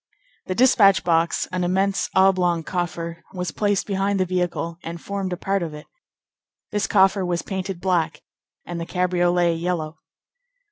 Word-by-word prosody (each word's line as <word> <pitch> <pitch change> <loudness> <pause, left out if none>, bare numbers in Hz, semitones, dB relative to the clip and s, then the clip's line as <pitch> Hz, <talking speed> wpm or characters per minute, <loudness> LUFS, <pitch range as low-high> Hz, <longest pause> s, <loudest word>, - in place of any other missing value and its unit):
The 185 - -2
despatch 205 -5 +5
box, 165 -1 +1
an 185 -1 -1
immense 190 +2 +1
oblong 185 -3 +3
coffer, 170 0 -4
was 180 -3 -3
placed 205 +2 0
behind 195 0 0
the 185 - +2
vehicle 175 -2 -2
and 170 0 -6
formed 195 +1 -4
a 180 - -2
part 195 +2 -1
of 160 -3 -4
it. 150 - -10 0.9
This 210 0 0
coffer 195 -1 +4
was 175 -1 -1
painted 190 -1 -4
black, 165 -4 0 0.4
and 175 -1 -5
the 165 - -5
cabriolet 175 -1 +2
yellow. 165 -2 -3
180 Hz, 150 wpm, -23 LUFS, 170-195 Hz, 0.9 s, despatch